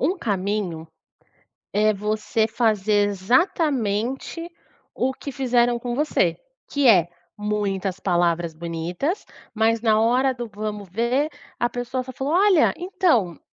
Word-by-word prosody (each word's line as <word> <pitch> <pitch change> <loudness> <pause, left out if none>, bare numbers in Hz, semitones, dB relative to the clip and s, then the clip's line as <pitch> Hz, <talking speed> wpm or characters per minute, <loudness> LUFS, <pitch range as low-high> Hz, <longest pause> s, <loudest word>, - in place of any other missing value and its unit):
um 370 +3 +1
caminho 195 - -2 0.9
é 215 +1 +3
você 215 +2 0
fazer 215 -3 +2
exatamente 255 - 0 0.5
o 265 +1 0
que 280 - -7
fizeram 245 -2 +2
com 240 0 -4
você, 300 +2 +1 0.3
que 285 -2 +1
é; 180 -8 +6 0.3
muitas 200 -2 -2
palavras 170 -3 +1
bonitas, 170 - -3 0.3
mas 225 +1 +2
na 220 -2 +3
hora 255 +4 +3
do 240 -2 -6
vamos 210 -1 -5
ver 240 - 0 0.3
a 240 - +1
pessoa 245 +2 -3
só 260 - -8
falou: 270 +4 -3
"Olha, 375 -2 +4
então, 340 - +1
225 Hz, 125 wpm, -23 LUFS, 200-260 Hz, 0.9 s, é